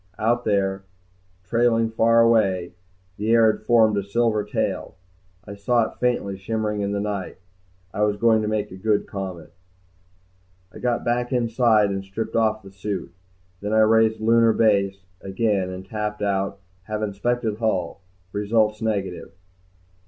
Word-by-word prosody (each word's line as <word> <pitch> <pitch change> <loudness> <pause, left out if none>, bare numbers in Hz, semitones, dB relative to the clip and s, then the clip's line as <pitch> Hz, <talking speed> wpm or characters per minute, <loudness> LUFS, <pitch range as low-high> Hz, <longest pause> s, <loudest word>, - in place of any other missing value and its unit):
Out 120 +2 0
there, 95 -2 0 0.6
trailing 115 +2 +1
far 115 +1 +4
away, 95 -7 +2 0.4
the 105 +2 -2
air 115 -1 +6
had - - -9
formed 110 -1 +4
a 100 - 0
silver 110 +1 0
tail, - - -3 0.5
I 100 - -8
saw 115 +4 +1
it - - -23
faintly 100 -6 -1
shimmering 105 +1 -2
in 100 0 -1
the 100 - -1
night. 100 -2 -4 0.6
I 105 - -3
was 105 -1 +1
going 110 0 +3
to 105 - -2
make 105 -1 -2
a 95 - -9
good 105 +1 0
comet. 95 -5 -7 1.2
I - - -10
got 120 -1 -1
back 120 +1 0
inside 115 -4 +2
and 95 0 -3
stripped 95 +3 -5
off 110 -2 +1
the 95 - -12
suit. 95 -2 -5 0.5
Then 105 +2 -3
I 110 - +5
raised 110 0 +3
Lunar 115 +1 +4
Base 100 -3 +1 0.2
again 95 -1 -1
and 95 0 -7
tapped 105 0 -4
out, 100 -1 -1 0.3
HAVE 110 +1 -3
INSPECTED 110 +2 -1
HULL. 100 -5 -1 0.3
RESULTS 105 +1 0
NEGATIVE. 100 -6 -3
105 Hz, 150 wpm, -23 LUFS, 100-115 Hz, 1.2 s, air